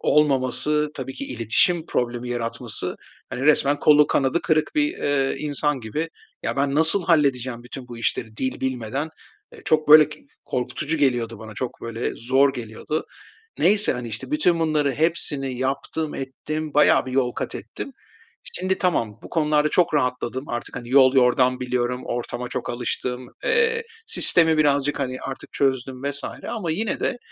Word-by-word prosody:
olmaması, 150 +1 +2
tabii 130 -1 -6
ki 140 - -6
iletişim 130 - +1
problemi 120 0 -2
yaratması, 120 -1 -3 0.3
hani, 125 - -4
resmen 145 -1 +4
kolu 150 0 +6
kanadı 135 +5 +1
kırık 155 -1 +1
bir, 300 +3 0
ııı, 135 -2 0
insan 150 -2 -1
gibi 150 +9 -3 0.3
ya, - - -2
ben 140 0 +1
nasıl 165 +4 +2
halledeceğim 130 -7 +1
bütün 125 +1 -9
bu 120 -1 -8
işleri 110 0 -2
dil 130 -1 -3
bilmeden? 130 +3 -2 0.4
Eee, - - -13
çok, 155 -1 +1
böyle, 155 0 +9
k 150 - -10 0.3
korkutucu 140 +5 -2
geliyordu 120 -6 0
bana, 110 0 -10
çok 125 +1 -5
böyle 115 +1 -3
zor 135 +3 +3
geliyordu. 120 +6 -4 0.5
Neyse, 205 +3 +4
hani, 125 -2 -5
işte, 110 - -7
bütün 180 - +2
bunları 150 -3 +1
hepsini 145 -4 0
yaptım, 140 +4 -2
ettim, 150 +3 -5
bayağı 145 -3 +5
bir 130 - -5
yol 125 -2 +1
katettim. - - -6 0.7
Şimdi 185 +1 -1
tamam, 115 - 0
bu - - -10
konularda 150 -2 +2
çok 175 -3 +2
rahatladım. 130 0 -1
Artık, 120 +1 -5
hani, 120 -1 -7
yol 130 -1 +6
yordam 125 0 +3
biliyorum, 125 0 -1
ortama 120 0 -4
çok - - -4
alıştım, 125 +1 -3 0.2
eee, 460 0 +2 0.2
sistemi 165 - +6
birazcık, 145 -1 +2
hani, 130 -1 -2
artık 135 - -7
çözdüm 130 -1 -1
vs. 140 0 -3 0.2
ama 210 -9 -3
yine 215 +7 -2
de 245 - -1
135 Hz, 155 wpm, -23 LUFS, 125-155 Hz, 0.7 s, böyle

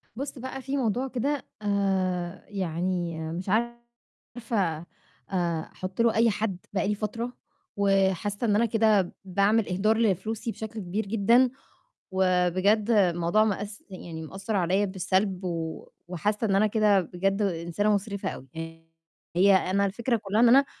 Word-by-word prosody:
بُصّ 275 +1 -5
بقى 260 +1 -6
فيه 270 +2 -3
موضوع 250 +1 0
كده 265 +3 -2 0.2
آآ، 190 -3 -1
يعني 175 -3 -2
مش 180 +3 -5
عارفة 230 -5 -3 0.5
آآ، 170 -4 -1
أحط 185 +4 -4
له 230 -1 +3
أي 230 +1 +4
حد 210 -3 -2 0.2
بقاى 195 0 0
لي 210 - +1
فترة 230 +4 -4 0.4
وحاسة 195 +2 +1
إن 205 - +3
أنا 230 +3 +3
كده، 215 -4 +2
باعمل 200 +3 +2
إهدار 215 +5 +2
لفلوسي 220 +2 0
بشكل 220 0 -7
كبير 200 +3 -3
جدًا 230 +5 +4 0.6
وبجد 185 +4 +2
الموضوع 180 -1 +3
مأس 205 0 -3
يعني 170 -4 -8
مأثّر 195 +7 -4
عليَّ 190 +3 +2
بالسلب 190 0 -1
و 165 -2 -4 0.2
وحاسة 205 +6 -1
إن 195 - +2
أنا 210 +2 +4
كده 210 -2 +3
بجد 195 +4 -1
إنسانة 190 +2 0
مُسرفة 200 0 -3
أوي. 135 - -9 0.9
هي 195 +2 +6
أنا 190 +1 +2
الفكرة 235 +5 0
كلّها 205 +2 0
إن 240 - +7
أنا 275 +3 +6
200 Hz, 140 wpm, -27 LUFS, 185-220 Hz, 0.9 s, إن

